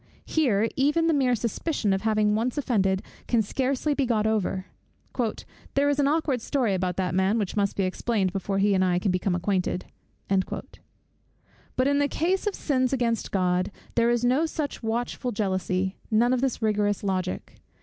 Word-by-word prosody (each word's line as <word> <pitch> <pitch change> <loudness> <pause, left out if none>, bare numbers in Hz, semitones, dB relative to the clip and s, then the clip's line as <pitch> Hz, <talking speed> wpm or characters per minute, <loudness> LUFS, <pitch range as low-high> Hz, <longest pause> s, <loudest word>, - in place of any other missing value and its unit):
Here, 225 -9 +2
even 295 +5 +2
the 330 - +3
mere 260 -4 +3
suspicion 235 -1 -1
of 190 - -1
having 215 -1 +2
once 230 +5 -1
offended 195 -9 +1 0.2
can 235 -2 +3
scarcely 265 +6 0
be 275 -2 0
got 220 -3 +1
over: 205 -3 0 1.1
"There 280 +1 +3
is 285 0 +1
an 280 - +3
aukward 290 -5 +1
story 245 -5 0
about 185 -1 -1
that 185 -1 -1
man, 190 +4 +2
which 205 -4 -2
must 200 -1 +1
be 195 - 0
explained 190 0 0
before 195 0 -2
he 200 +1 +3
and 185 -1 +3
I 180 -1 +2
can 185 +2 +1
become 185 0 0
acquainted." 180 0 -1 0.4
But 195 +6 -5
in 285 0 +2
the 285 - +3
case 370 +8 0
of 415 - 0
sins 255 -4 0
against 235 -3 0
God, 180 -1 +1 0.2
there 235 0 +3
is 240 0 +1
no 270 +7 +3
such 300 -3 -4
watchful 240 +2 -2
jealousy, 190 -2 -1
none 235 +3 +3
of 250 - +1
this 265 -4 -1
rigorous 205 -2 +1
logic. 185 -2 -3
220 Hz, 175 wpm, -26 LUFS, 190-260 Hz, 1.1 s, the